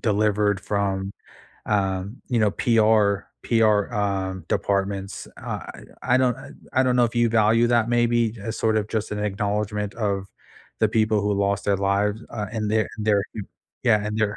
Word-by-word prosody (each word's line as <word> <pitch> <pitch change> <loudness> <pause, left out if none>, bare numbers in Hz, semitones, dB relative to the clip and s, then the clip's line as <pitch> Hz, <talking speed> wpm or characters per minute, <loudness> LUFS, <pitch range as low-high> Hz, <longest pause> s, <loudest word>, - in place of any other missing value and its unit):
delivered 105 -2 +1
from, 100 -1 -2 0.5
um, 100 +1 -1
you 120 -3 +1
know, 105 - +3
PR 110 -2 +2 0.2
PR, 110 -1 +2
um, 95 -3 -2
departments. 100 0 -2
Uh, - - -5 0.4
I 125 - +2
I - - +6
don't 130 -2 +2
uh, 135 - -11 0.2
I 130 - +3
don't 125 -1 +2
know 120 - +5
if 115 +1 -3
you 120 -1 +4
value 115 +1 +3
that 120 -2 +2
maybe 120 -1 +2
as 110 +2 -5
sorta 110 -2 +1
just 110 -1 -2
an 105 - -3
acknowledgement 105 0 -2
of 100 -4 -2 0.5
the 110 - +4
people 110 -1 +2
who 105 0 0
lost 100 0 0
their 100 -1 +2
lives, 100 +3 0
uh, 105 -2 -4
and 105 -2 -2
their 110 0 +1
their 105 -2 +2
m 105 - -5 0.4
Yeah, 105 -4 +3
and 105 +1 -3
their 105 -1 0
105 Hz, 175 wpm, -24 LUFS, 100-115 Hz, 0.5 s, I